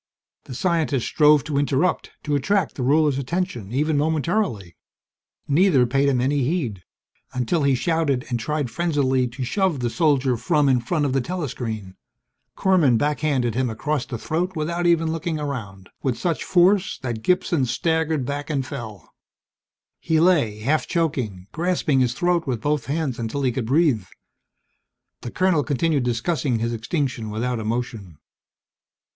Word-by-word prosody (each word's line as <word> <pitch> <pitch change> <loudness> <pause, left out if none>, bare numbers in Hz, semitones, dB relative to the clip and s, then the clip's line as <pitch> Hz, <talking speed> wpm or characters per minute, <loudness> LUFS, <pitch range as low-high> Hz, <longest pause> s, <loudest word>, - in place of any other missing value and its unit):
The 130 - -8
scientist 160 -6 0
strove 150 -2 +4
to 145 -2 -1
interrupt, 145 +5 0
to 150 - -2
attract 190 +6 +1
the - - -6
ruler's 145 +1 +3
attention 135 - -3
even 145 +3 +1
momentarily. 155 - -1 0.7
Neither 145 -3 +4
paid 135 +3 +2
him 130 -3 +1
any 140 +3 +1
heed, 125 - -2 0.5
until 130 +7 0
he 140 -2 +3
shouted 150 -3 0
and 120 -2 -1
tried 145 0 -2
frenziedly 135 -4 +1
to 125 +2 -6
shove 185 +3 0
the 120 -1 -1
soldier 140 -6 +2
from 140 +5 +2
in 130 -2 +4
front 150 +5 0
of 135 - 0
the 135 - +2
telescreen. 120 - -5 0.6
Korman 170 -11 +3
backhanded 145 -3 0
him 125 +1 0
across 135 +5 -2
the 120 - -4
throat 175 +9 -2
without 170 +3 -1
looking 165 -1 0
around, 105 -10 -6
with 130 -3 -1
such 170 -3 -1
force 185 +1 +3
that 120 -3 -3
Gibson 165 -2 +1
staggered 160 0 0
back 145 +3 -4
and 140 -4 -1
fell. 110 - -8 0.9
He 160 -1 +1
lay, 150 - +2
half 150 +7 +1
choking, 130 - -2
grasping 165 -5 0
his 125 -1 +1
throat 175 -2 +1
with 125 -4 -1
both 145 -2 -1
hands 145 -4 -2
until 115 +5 -3
he 130 - +2
could 120 -2 -3
breathe. 135 - +2 1.2
The - - -5
colonel 180 0 +2
continued 150 +1 +1
discussing 125 +2 0
his 115 +1 -2
extinction 120 -1 -2
without 120 +3 -2
emotion. 110 -6 -4
140 Hz, 150 wpm, -23 LUFS, 120-160 Hz, 1.2 s, strove